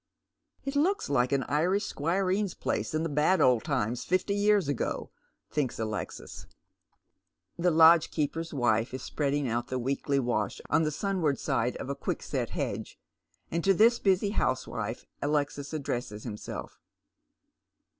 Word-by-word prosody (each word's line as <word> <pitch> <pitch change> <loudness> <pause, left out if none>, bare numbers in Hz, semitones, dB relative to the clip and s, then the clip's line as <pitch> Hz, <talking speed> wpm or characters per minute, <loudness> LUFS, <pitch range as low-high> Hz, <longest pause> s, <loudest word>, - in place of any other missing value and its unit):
" - - -42
It 275 +1 -3
looks 340 - +1
like 125 -2 +2
an 135 -1 +2
Irish 180 +7 +1
squireen's 185 +5 0
place - - -2
in 155 - 0
the - - 0
bad 150 +5 +2
old 125 -6 +4
times 115 +4 -1
fifty 185 +3 0
years 205 -4 +3
ago," 145 - -2 0.4
thinks 145 -5 -1
Alexis. 110 -1 -5 1.1
The 175 +1 +2
lodgekeeper's 165 -1 +4
wife 120 -3 +1
is 130 - -6
spreading 145 -1 -1
out 120 +1 -1
the 130 - -2
weekly 140 +2 -1
wash 120 -6 -1
on - - +4
the 155 - +1
sunward 160 -3 0
side 120 +2 -1
of - - -6
a 140 - -2
quickset - - -3
hedge, - - -4 0.5
and 170 0 -1
to 195 0 +4
this 230 +5 +5
busy 195 +1 +2
housewife 125 - -2 0.2
Alexis 145 -1 -1
addresses 120 -8 -4
himself. 105 -3 -7
145 Hz, 145 wpm, -29 LUFS, 125-180 Hz, 1.1 s, this